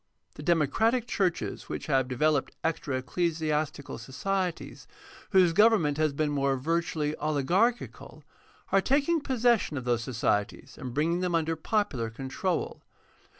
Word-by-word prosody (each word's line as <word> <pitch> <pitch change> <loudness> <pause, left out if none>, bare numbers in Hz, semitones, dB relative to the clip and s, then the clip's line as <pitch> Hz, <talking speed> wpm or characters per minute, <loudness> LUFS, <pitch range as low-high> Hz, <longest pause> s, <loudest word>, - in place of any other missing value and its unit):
The - - -10
democratic 175 - +2
churches 190 -7 -2
which - - -4
have 135 -4 +1
developed 145 +2 0
extra 155 -4 -1
ecclesiastical 155 -1 -2
societies, 175 +9 -3 0.4
whose 185 -4 +4
govern 220 0 +5
ment 145 -1 0
has 155 -1 +2
been 145 +1 -1 0.3
virtually 155 0 -1
oligarchical, 170 - -1 0.5
are 195 - +4
taking 290 - +2
possession 240 - +1
of 130 - -4
those 120 -1 0
societies 115 -4 -2
and 125 - -7
bringing 160 +6 0
them 180 -2 0
under 165 0 0
popular 160 - -1
control. 135 - -3
160 Hz, 125 wpm, -28 LUFS, 140-190 Hz, 0.5 s, govern